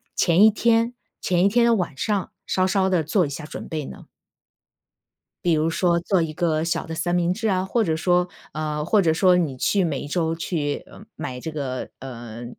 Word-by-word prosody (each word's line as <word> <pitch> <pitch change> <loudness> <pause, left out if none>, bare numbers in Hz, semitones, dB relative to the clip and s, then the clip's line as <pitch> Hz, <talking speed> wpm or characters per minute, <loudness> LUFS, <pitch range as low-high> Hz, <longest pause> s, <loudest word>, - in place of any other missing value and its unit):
前 175 +4 +4
一 220 - +9
天 230 +2 +2 0.3
前 180 0 +2
一 - - +6
天 235 +4 +3
的 235 - +4
晚 180 -8 -2
上 200 +6 -1 0.2
稍 185 - +1
稍 190 0 +2
地 180 -4 +2
做 175 +2 +1
一 - - -7
下 145 +2 -6
准 - - -8
备 155 -3 -3
呢？ - - -11 1.4
比 175 -2 +3
如 155 +1 +2
说 170 +1 +2
做 180 +1 +1
一 160 -1 -2
个 160 -1 0
小 165 - -1
的 160 - -6
三 175 +2 -1
明 175 0 +2
治 220 +3 -2
啊， 185 -2 +1
或 225 +4 +1
者 160 -5 0
说， 180 +2 +2 0.3
呃 150 -1 -2
或 205 +6 +3
者 165 -4 +3
说 180 +2 +4
你 150 -7 0
去 195 +9 +2
每 155 -6 -1
1 - - -6
周 165 +1 0
去 155 -4 -2 0.3
买 125 -1 -5
这 160 - -5
个， 135 -4 -4
呃 120 -3 -8
170 Hz, 220 characters per minute, -23 LUFS, 155-190 Hz, 1.4 s, 一